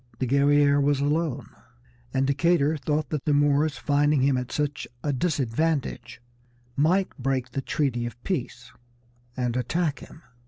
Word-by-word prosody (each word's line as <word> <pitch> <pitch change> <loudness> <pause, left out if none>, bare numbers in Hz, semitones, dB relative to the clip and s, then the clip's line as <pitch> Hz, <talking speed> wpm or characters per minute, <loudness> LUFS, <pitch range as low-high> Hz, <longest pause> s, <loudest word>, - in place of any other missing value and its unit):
The 130 - -1
Guerrière 140 +2 +4
was 140 0 +2
alone, 150 -1 -1 0.7
and 135 +1 +1
Decatur 150 +2 +2
thought 150 +1 -2
that 150 -2 -3
the 150 -2 +2
Moors, 145 0 +2
finding 145 -1 +2
him 135 -1 +3
at 125 -1 -3
such 145 -1 -2 0.2
a 145 - 0
disadvantage, 145 -2 -1 0.6
might 180 +7 +1
break 130 -1 -1
their 135 - -3
treaty 125 -5 -1
of 120 0 -10
peace, 125 -8 -4 0.7
and 125 -2 -1
attack 150 +4 -1
him. 155 - -14
145 Hz, 145 wpm, -25 LUFS, 130-150 Hz, 0.7 s, Guerrière